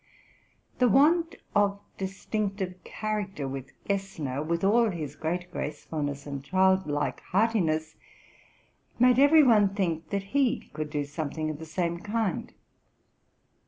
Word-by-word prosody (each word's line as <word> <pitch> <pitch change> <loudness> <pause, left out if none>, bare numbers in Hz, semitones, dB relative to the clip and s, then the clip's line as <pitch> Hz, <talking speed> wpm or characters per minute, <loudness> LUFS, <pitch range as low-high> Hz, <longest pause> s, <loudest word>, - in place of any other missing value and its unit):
The 250 -1 +5
want 330 - +4 0.2
of 200 -1 +2 0.2
distinctive 195 0 -3
chai 215 -1 -2
acter 190 -8 -6
with 135 0 -6 0.2
Gessner, 165 -9 -2
with 170 +3 -1
all 225 +3 +4
his 155 -6 -5
great 175 +3 -3
gracefulness 145 -3 -4
and 140 -2 -5
anil 190 +2 +3
like 145 0 -1
heartiness, 175 -7 0 1.0
made 250 +1 +5
every 300 +3 +7
one 210 -6 +4
think 170 -5 -1
that 200 -1 -1
he 275 -4 +1
could 155 0 -4
do 145 -1 -2
some 145 +1 -4
thing 155 +1 -3
of 150 - -8
the 160 - -8
same 170 +1 -1
kind. 210 0 -2
185 Hz, 135 wpm, -28 LUFS, 155-210 Hz, 1.0 s, every